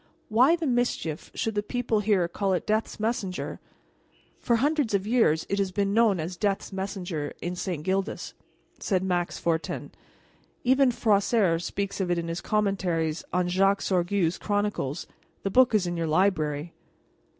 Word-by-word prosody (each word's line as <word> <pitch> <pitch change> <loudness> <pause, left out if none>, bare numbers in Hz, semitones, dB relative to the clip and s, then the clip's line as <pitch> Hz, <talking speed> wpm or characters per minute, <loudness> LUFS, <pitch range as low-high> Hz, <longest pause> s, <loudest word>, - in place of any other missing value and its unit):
Why 255 +9 +5
the 335 -2 -3
mischief 245 - -1
should 225 - -1
the 205 - 0
people 235 0 -1
here 200 -4 +2
call 195 +2 -1
it 180 - -1
death's 215 +1 -1
messenger?" 215 -4 -2 0.8
"For 235 - +2
hundreds 280 -2 +1
of 195 0 0
years 215 -9 +2
it 200 - -1
has 195 -2 0
been 200 +1 0
known 220 -4 +4
as 170 +3 -4
death's 200 +1 -1
messenger 185 -6 -4
in 175 +1 -4
St. 175 -4 -3
Gildas," 190 +4 -2 0.5
said 190 -3 0
Max 175 -2 -1
Fortin. 165 -1 -2 0.7
"Even 260 +1 +4
Froissart 205 -6 +2
speaks 200 +2 -3
of 185 - -1
it 175 - +1
in 170 0 -3
his 165 +2 -3
commentaries 180 -6 0
on 180 0 +1
Jacques 195 +2 +2
Sorgue's 180 -1 +1
Chronicles. 205 -8 -1 0.4
The 195 - -1
book 250 0 +5
is 200 -4 +3
in 175 0 -2
your 165 -1 -1
library." 155 -2 +1
195 Hz, 160 wpm, -27 LUFS, 175-215 Hz, 0.8 s, Why